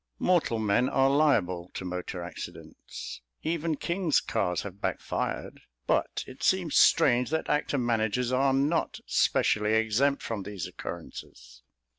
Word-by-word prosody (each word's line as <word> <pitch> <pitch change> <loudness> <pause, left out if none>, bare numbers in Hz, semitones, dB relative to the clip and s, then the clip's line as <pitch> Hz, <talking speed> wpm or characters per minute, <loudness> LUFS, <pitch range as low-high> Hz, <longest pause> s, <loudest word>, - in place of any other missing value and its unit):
Mortal 175 -10 +2
men 110 +4 +2
are 135 0 +3
liable 95 - +2
to 95 - -5
motor 90 0 -4
accidents; 65 -7 -8 0.2
even 165 0 -1
king's 170 -1 +1
cars 90 -1 -1
have 100 0 -9
backfired; - - -3 0.2
but - - 0
it 130 - -12
seems 180 -5 +1
strange 120 +1 +5
that 160 +1 -1
actor 145 -1 0
managers 120 0 0
are 135 +1 +3
not 140 +5 0
specially 105 +1 +2
exempt 110 +6 +2
from 110 -3 -3
these 100 -3 -5
occurrences. - - -9
120 Hz, 130 wpm, -28 LUFS, 100-145 Hz, 0.2 s, strange